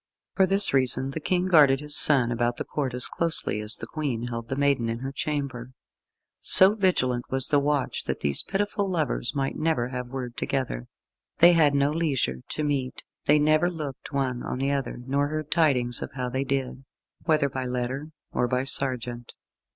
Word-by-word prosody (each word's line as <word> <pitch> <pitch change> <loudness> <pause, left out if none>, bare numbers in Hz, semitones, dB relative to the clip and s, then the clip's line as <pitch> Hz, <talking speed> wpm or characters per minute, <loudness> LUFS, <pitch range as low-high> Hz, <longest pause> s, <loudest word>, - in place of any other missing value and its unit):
For 190 -1 +4
this 195 -2 +5
reason 130 0 +1
the 160 - -4
King 180 +3 0
guarded 150 -7 +5
his 150 0 -5
son 130 -5 +4
about 120 0 -1
the - - -4
Court 135 -4 -3
as 125 - 0
closely 165 -10 -1
as 105 +1 +1
the - - -6
Queen 125 -7 -3
held 115 -1 -6
the 130 - -2
maiden 140 -4 +1
in 115 - -2
her 135 +1 -4
chamber. 140 -5 -4 0.7
So 190 +2 +6
vigilant 130 - 0
was 130 0 +1
the 145 - +4
watch 145 -1 -1
that - - -3
these 70 -1 +2
pitiful 205 0 -2
lovers - - -2
might 135 -1 -2
never 155 -7 0
have 125 -1 -5
word 125 -1 -6
together. 125 - -3 0.5
They 175 +1 +7
had 150 -4 +4
no 140 +1 +2
leisure 140 - -1
to 155 - -3
meet; 135 -3 -2 0.2
they 150 - +5
never 155 +3 +3
looked 150 -6 -7
one 130 -3 -2
on - - -4
the 135 +2 0
other; 140 -3 -2
nor 140 +2 0
heard 155 0 -5
tidings 130 -8 +2
of - - -6
how 125 -2 -3
they 130 +2 -2
did, 135 -1 -3 0.4
whether 155 -3 +2
by 130 -1 -4
letter 125 +3 -3 0.2
or 125 - 0
by 125 +1 0
sergeant. 125 -3 0
135 Hz, 190 wpm, -25 LUFS, 125-150 Hz, 0.7 s, They